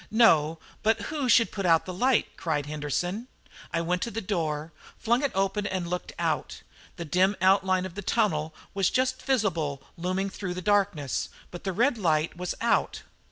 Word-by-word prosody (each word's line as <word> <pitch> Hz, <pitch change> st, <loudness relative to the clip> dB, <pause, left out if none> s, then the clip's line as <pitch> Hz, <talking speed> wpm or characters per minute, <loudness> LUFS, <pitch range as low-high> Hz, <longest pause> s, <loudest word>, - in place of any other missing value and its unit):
"No; 165 Hz, -9 st, +4 dB, 0.2 s
but 220 Hz, +1 st, +2 dB
who 285 Hz, -5 st, -1 dB
should 230 Hz, -1 st, +5 dB
put 200 Hz, -, -4 dB
out 165 Hz, -3 st, +4 dB
the 185 Hz, -, -5 dB
light?" 250 Hz, +6 st, +3 dB
cried 160 Hz, -5 st, -1 dB
Henderson. 155 Hz, -, -3 dB, 0.4 s
I 165 Hz, -, 0 dB
went 180 Hz, +2 st, -1 dB
to -, -, -1 dB
the 225 Hz, -, -4 dB
door, 165 Hz, -6 st, -2 dB, 0.3 s
flung 235 Hz, +3 st, +1 dB
it 285 Hz, -3 st, 0 dB
open, 195 Hz, +1 st, 0 dB
and 185 Hz, -2 st, -2 dB
looked 180 Hz, +1 st, -4 dB
out. -, -, -2 dB, 0.3 s
The 170 Hz, -, -6 dB
dim 185 Hz, +5 st, +2 dB
outline 185 Hz, 0 st, +3 dB
of 185 Hz, -, -7 dB
the 205 Hz, -, -5 dB
tunnel 160 Hz, -8 st, 0 dB, 0.2 s
was 195 Hz, -2 st, +2 dB
just 255 Hz, 0 st, 0 dB
visible 165 Hz, -, 0 dB, 0.2 s
looming 185 Hz, +3 st, -1 dB
through 185 Hz, -3 st, -4 dB
the 185 Hz, -, -4 dB
darkness, 200 Hz, -9 st, +1 dB, 0.2 s
but 175 Hz, -, -9 dB
the 190 Hz, -, 0 dB
red 235 Hz, +5 st, +2 dB
light 160 Hz, -4 st, +1 dB
was 180 Hz, 0 st, -3 dB
out. 235 Hz, -, +1 dB
185 Hz, 180 wpm, -27 LUFS, 165-210 Hz, 0.4 s, should